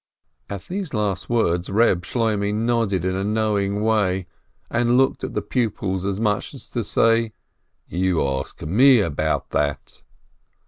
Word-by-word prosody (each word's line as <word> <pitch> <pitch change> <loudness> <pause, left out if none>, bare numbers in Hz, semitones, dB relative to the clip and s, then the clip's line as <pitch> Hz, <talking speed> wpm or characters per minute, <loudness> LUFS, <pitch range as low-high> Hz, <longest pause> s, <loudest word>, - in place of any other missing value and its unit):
At 100 -2 -6
these 185 -6 -5
last 100 -3 -1
words 90 -7 +1
Reb 100 -3 +3
Shloimeh 105 -3 0
nodded 110 -5 0
in 95 - 0
a 95 - -1
know 110 +1 0
ing 100 +1 -1
way, 100 -4 +1 0.4
and 120 +1 +2
looked 135 0 +2
at - - -4
the - - -1
pupils 100 -6 -1
as 100 0 -2
much 105 -2 -1
as - - -6
to - - -2
say, 115 -1 +2 0.5
"You 90 -2 0
ask 65 0 -4
me 125 - +5
about 80 -3 -1
that 75 -1 -2
105 Hz, 150 wpm, -22 LUFS, 95-115 Hz, 0.5 s, me